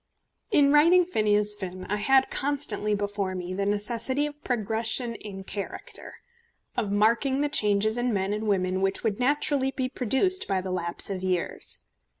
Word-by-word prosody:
In 285 - +4
writing 340 +4 +6
Phineas 210 - +2
Finn 185 -2 -7
I 210 - -1
had 265 +5 +3
constantly 250 -7 0
before 200 -2 -3
me 180 0 -5
the 200 +1 -1
necessity 230 +7 -1
of 295 0 -8
progression 230 +1 -1
in 200 -3 -8
character, 200 +1 -7 0.6
of 220 -5 -1
marking 235 +7 +2
the 295 - 0
changes 215 -3 +2
in 245 0 0
men 195 -1 -1
and 215 +1 -3
women 185 -2 0
which 195 0 0
would 215 -2 -1
naturally 275 +1 +1
be 260 -1 -2
produced 275 - 0
by 195 -2 0
the 185 0 -5
lapse 175 +1 -1
of 190 -2 -4
years. 185 -2 -2
215 Hz, 160 wpm, -26 LUFS, 195-265 Hz, 0.6 s, writing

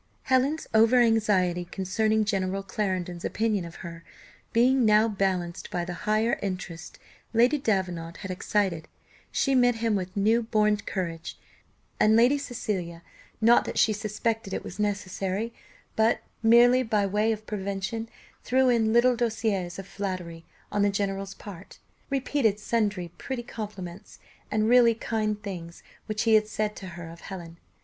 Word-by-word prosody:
Helen's 265 +4 +1
over 225 +3 +5
anxiety 205 -7 +2
concerning 215 +4 0
General 195 -2 -1
Clarendon's 185 -3 -3
opinion 215 -4 0
of 170 - -10
her, 170 0 -8 0.5
being 250 +2 +4
now 215 0 +5
balanced 190 -4 -2
by 175 -1 -2
the 180 - -5 0.2
higher 220 +2 +2
interest 185 -4 -5 0.4
Lady 250 +6 +4
Davenant 180 -8 -1
had 190 - -4
excited, 185 -3 -1 0.4
she 275 - +1
met 245 -2 +4
him 225 -1 0
with 185 +1 -4
new 220 +4 +3
born 210 -2 +2
courage; 170 -5 -5 0.6
and 215 +1 +5
Lady 245 +5 +5
Cecilia, 185 -10 -4 0.4
not 230 +2 +6
that - - -5
she 215 - +4
suspected 215 -1 -2
it - - -4
was 185 - -9
necessary, 205 +1 -2 0.4
but 220 +1 +2 0.2
merely 240 +3 +6
by 215 -4 +1
way 210 +3 +1
of 215 -1 -4
prevention, 200 +3 -4 0.3
threw 260 0 +3
in 225 -2 +2
little 245 +1 +5
douceurs 220 -6 -1
of 195 - -7
flattery, 180 -5 -5 0.3
on 205 - 0
the 205 - +4
general's 195 -1 -2
part, 195 -3 -11 0.3
repeated 265 -6 +1
sundry 210 -5 -1
pretty 260 -3 -4
compliments, 205 -5 -8 0.3
and 215 0 +1
really 235 -1 +6
kind 215 -2 -2
things 170 -4 -7 0.2
which 215 -1 -1
he 225 -1 +3
had 215 -1 +5
said 215 0 -2
to 190 - -8
her 170 -1 -7
of 165 +1 -11
Helen. 170 -3 -9
210 Hz, 150 wpm, -27 LUFS, 185-225 Hz, 0.6 s, not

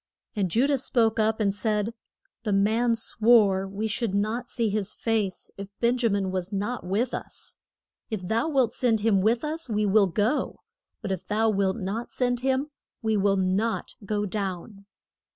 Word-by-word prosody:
And 195 -3 0
Ju 235 +9 +3
dah 285 -1 +2
spoke 230 -3 +1
up 220 0 +2
and 200 -2 +2
said, 210 +1 -1 0.5
The 215 - -2
man 225 +4 +3
swore 215 -4 +3
we 200 +3 -3
should 225 -3 -1
not 220 +4 -1
see 230 -2 0
his 205 -1 -1
face 215 -5 -1
if 200 - -5
Ben 235 +1 +3
ja 235 -2 +3
min 195 -2 0
was 185 +1 -3
not 210 +5 -2
with 205 +7 -1
us. - - -6 0.5
If 215 -5 -3
thou 230 - +1
wilt 260 -6 +2
send 225 -4 +1
him 205 -3 +3
with 230 +6 +2
us 310 -1 -3
we 210 -1 +1
will 200 0 +4
go; 210 - 0 0.5
but 200 - -3
if 185 -2 -4
thou 220 +1 +2
wilt 195 0 +1
not 215 +3 -4
send 245 -1 0
him 265 +3 0 0.3
we 220 -1 +1
will 200 -1 +2
not 190 +5 0
go 205 +1 -1
down. 195 0 -5
215 Hz, 180 wpm, -26 LUFS, 195-235 Hz, 0.5 s, will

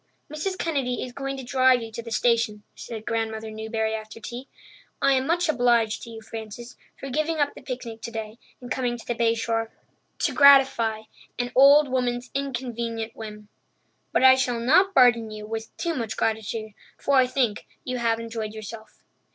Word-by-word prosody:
"Mrs. 370 +5 -3
Kennedy 275 -8 -1
is 250 - -7
going 275 +1 -4
to 265 - -6
drive 255 -1 +3
you 225 - -8
to 225 +2 -6
the 230 - -9
station," 230 -2 +1
said 220 -2 -8
Grandmother 225 -1 -2
Newbury 220 0 -2
after 215 0 -7
tea. 245 +4 -7 0.5
"I 275 - +4
am 260 0 +1
much 345 +1 +1
obliged 240 -6 +2
to - - -9
you, 225 -1 -10
Frances, 225 +2 -8 0.2
for 275 - -6
giving 310 +4 0
up 290 -1 +1
the - - -12
picnic 240 -3 -6
today 225 0 -6 0.2
and 245 -1 -10
coming 245 -2 -1
to 230 - -13
the 240 - -1
Bay 230 0 +2
Shore 225 0 -1 0.5
to - - 0
gratify 270 -6 +5 0.3
an 245 0 -2
old 280 +3 +7
woman's 250 -1 -1
inconvenient 235 -4 -3
whim. 210 -1 -9 0.6
But - - +2
I 260 0 +9
shall 255 -2 0
not 365 +11 +4
burden 240 -3 +5
you 215 0 -8
with 220 0 -6
too 340 - -1
much 230 -6 -4
gratitude, 220 0 -2 0.3
for 280 - -1
I 255 -1 +5
think 250 -5 -1 0.2
you 255 -1 -3
have 230 -1 +1
enjoyed 225 -2 -5
yourself." 220 0 -10
235 Hz, 180 wpm, -25 LUFS, 225-260 Hz, 0.6 s, I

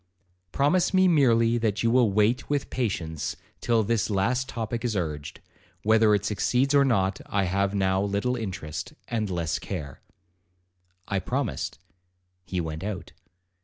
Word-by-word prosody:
'Promise 175 +7 +2
me 185 0 +5
merely 120 -8 +4
that 110 -2 0
you 115 - +3
will 120 -4 +4
wait 110 +5 +2
with 145 -1 -1
patience 85 - -2 0.2
till 115 -2 +2
this 115 +1 0
last 120 +6 0
topic 115 -1 -3
is 120 -3 -1
urged; 75 -6 -4 0.4
whether 110 0 +5
it 100 0 -2
succeeds 125 +6 +1
or 140 -1 +6
not 100 -7 +1
I 100 -1 +1
have 100 +2 0
now 95 -1 +2
little 100 +5 0
interest, 95 -9 -5 0.2
and 110 -3 -1
less 85 -3 -1
care.' 80 -6 -6 1.1
I 100 - 0
promised,—he 90 - -5
went 80 -1 -4
out. 100 -3 -5
105 Hz, 140 wpm, -26 LUFS, 90-120 Hz, 1.1 s, or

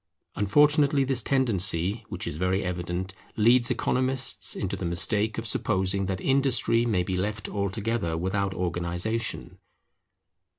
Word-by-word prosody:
Unfortunately 145 - +3
this 130 -2 +1
tendency, 105 -5 +1
which - - -4
is 75 - -4
very 90 +3 0
evident, 90 +1 -4 0.2
leads 120 +3 +4
economists 130 +1 -1
into 100 -1 -3
the 95 - -7
mistake 100 +6 +1
of 115 - -4
supposing 95 -2 0
that 95 -1 -3
industry 130 -3 +2
may 95 -6 +1
be 95 +1 -3
left 105 +4 -3
altogether 100 -3 -2
without 95 +2 -2
organization. 90 +6 -3
100 Hz, 125 wpm, -26 LUFS, 90-120 Hz, 0.2 s, leads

